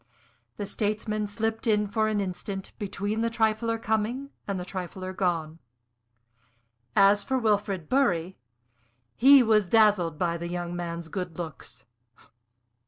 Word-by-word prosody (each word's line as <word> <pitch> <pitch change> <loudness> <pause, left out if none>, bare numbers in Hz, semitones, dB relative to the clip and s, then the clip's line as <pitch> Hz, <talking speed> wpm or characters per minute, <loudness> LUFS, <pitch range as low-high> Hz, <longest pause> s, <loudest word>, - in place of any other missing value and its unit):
The 205 - -3
statesman 215 0 -2
slipped 225 +2 -2
in 210 -1 +3
for 215 +2 0
an 215 -1 0
instant 195 0 -4
between 205 +2 -2
the 230 - +1
trifler 225 0 +1
coming 225 +5 -2 0.2
and 200 -2 -2
the 180 - -5
trifler 185 0 -6
gone. 165 -4 -1 1.4
As 200 +1 +5
for 265 - 0
Wilfrid 205 -7 0
Bury, 190 - +1 0.8
he 270 +2 +7
was 215 -5 +3
dazzled 205 -8 +4
by 170 0 0
the 170 +1 -5
young 175 0 -4
man's 170 -1 -5
good 180 -1 -5
looks. 155 -7 -8
205 Hz, 130 wpm, -27 LUFS, 175-220 Hz, 1.4 s, he